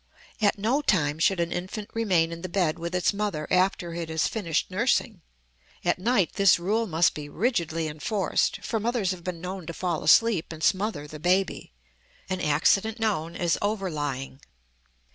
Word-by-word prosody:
At 205 -1 +3
no 235 +8 +1
time 160 - +1
should 185 +2 +2
an 170 0 0
infant 190 +4 -4
remain 185 -8 +2
in 165 0 -7
the 185 - -5
bed 175 -3 0
with 170 +2 -4
its 180 +3 +2
mother 200 -7 -2
after 180 -2 +1
it 165 -1 -4
has 160 -1 +1
finished 190 -7 -2
nursing; 220 -2 0 0.6
at - - +1
night 205 -3 +1
this 195 -2 +5
rule 215 +6 0
must 170 -1 +3
be 145 -1 -7
rigidly 165 - -1
enforced, 160 +4 -1
for 225 - -1
mothers 225 -3 0
have 180 -2 -7
been 180 -2 -4
known 180 -1 -6
to 170 - -4
fall 175 -2 -2
asleep 195 0 +4
and 160 -1 -8
smother 195 -6 +1
the 155 +1 -9
baby, 185 - 0 0.6
an 185 - -1
accident 195 - +2
known 170 -7 -1
as 170 -2 0
over 205 -3 -1
lying. 135 -3 -4
180 Hz, 175 wpm, -26 LUFS, 165-205 Hz, 0.6 s, this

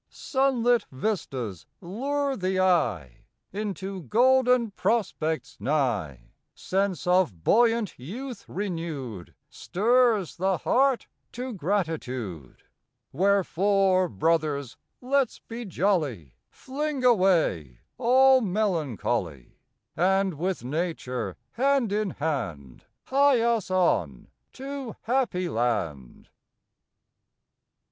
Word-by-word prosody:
Sunlit 245 -4 +1
vistas 130 - -3
lure 275 +9 -2
the 185 -3 -1
eye 120 - 0 0.3
Into 195 -2 -4
golden 250 - +3
prospects 190 -7 -1
nigh. 110 - -1 0.2
Sense 190 -1 -1
of 180 - +2
buoyant 230 - +2
youth 225 - -7
renewed 165 - -5
Stirs 220 -1 +1
the 190 +1 +1
heart 265 - +2 0.3
to 250 +1 -5
gratitude. 145 - -3 0.5
Wherefore, 195 -1 +2
Brothers, 145 0 0 0.3
let 270 +1 +2
s - - -16
be 235 +1 -8
jolly! 155 - -1 0.2
Fling 285 0 -4
away 175 - +2 0.2
all 260 +2 +5
melancholy, 145 - -2 0.4
And 190 +3 +2
with 175 -1 -3
Nature, 125 - -3
hand 270 - +1
in 210 0 0
hand* 115 - -4 0.2
Hie 275 -2 +3
us 230 -4 +1
on 130 - 0 0.2
to 270 -3 -6
Happyland! 120 - -1
185 Hz, 85 wpm, -26 LUFS, -, 0.5 s, all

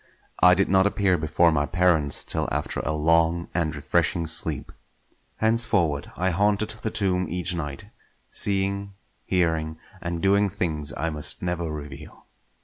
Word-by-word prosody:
I 90 0 +7
did 95 - +1
not 95 +1 +4
appear 100 -3 +1
before 80 +1 +2
my 75 -2 0
parents 85 -5 +2
till - - -2
after - - -2
a 70 - -2
long 80 +2 +2
and 80 -3 -1
refreshing 80 +3 0
sleep. 80 +1 -2 0.7
Henceforward 105 -10 +1
I 95 +1 +1
haunted 105 +4 +1
the 110 - -2
tomb 95 -4 0
each 90 0 0
night; 75 -5 -5 0.5
seeing, 100 0 0 0.3
hearing, 80 -3 0 0.2
and 85 -1 -3
doing 100 +3 +3
things 80 -7 -2
I 80 +3 -1
must 75 +2 0
never 85 -2 -2
reveal. 75 0 -9
85 Hz, 140 wpm, -24 LUFS, 80-95 Hz, 0.7 s, I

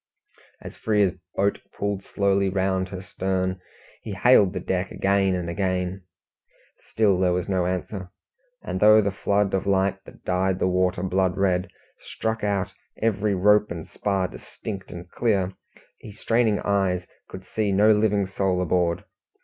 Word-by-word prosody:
As - - -9
Frere's 105 -4 +1 0.2
boat 100 +1 +1
pulled 100 -1 -3
slowly 100 -1 +1
round 95 -1 0
her 95 0 -7
stern, 95 0 -2 0.4
he 105 - -6
hailed 100 -1 +5
the 95 - -4
deck 90 +1 -2
again 95 -1 +1
and 90 -2 -3
again. 90 +1 -2 0.8
Still 105 -5 +2
there 90 -1 +2
was 90 0 -2
no 95 -3 0
answer, 95 +1 -4 0.5
and 95 - -3
though 110 +1 +7
the 100 -2 +1
flood 100 +1 0
of 95 +1 -1
light 95 0 +1
that - - -16
dyed 95 +1 +1
the - - 0
water 90 0 +1
blood 95 -1 +1
red 95 -1 +1 0.3
struck 110 -1 -4
out 100 -2 -1 0.3
every 105 -2 +1
rope 105 +3 +4
and 85 -2 -6
spar 95 -2 -1
distinct 95 +1 -8
and 90 +1 -8
clear, 100 -5 0 0.5
his 105 0 -12
straining 115 -2 +2
eyes 95 -3 0 0.2
could 95 0 -10
see 105 -2 -1
no 105 +3 +5
living 105 -2 +2
soul 95 -1 -1
aboard. 90 -1 0
95 Hz, 155 wpm, -24 LUFS, 90-100 Hz, 0.8 s, though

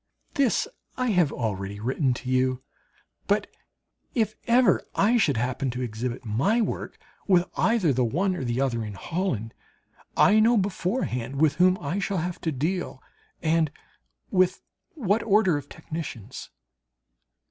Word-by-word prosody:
This 275 - +2 0.3
I 250 -2 +1
have 175 -7 +3
already 100 -3 -3
written 130 +4 0
to 125 - -8
you. 130 0 +1 0.6
But - - +2 0.7
if 220 -3 +1
ever 235 -4 +4
I 225 +5 +4
should 145 - +2
happen 130 +3 -1
to 125 +1 -3
exhibit 120 +2 -4
my 135 - +1
work 225 - -2 0.3
with 180 -2 +4
either 195 -8 +2
the 130 0 +1
one 180 - 0
or 175 - -4
the 120 0 -1
other 120 -4 0
in 105 -2 -6
Holland, 125 - -3 0.6
I 210 +3 +6
know 230 +2 +5
beforehand 180 - -1
with 155 -1 +3
whom 185 +1 +5
I 160 +7 -2
shall 195 0 -1
have 175 +1 -3
to 160 - -1
deal, 155 +2 -2 0.4
and 160 -1 +2 0.6
with 185 0 +2 0.3
what 220 - +1
order 205 -5 +3
of 145 -1 -5
technicians. 140 -8 -7
160 Hz, 145 wpm, -26 LUFS, 125-195 Hz, 0.7 s, I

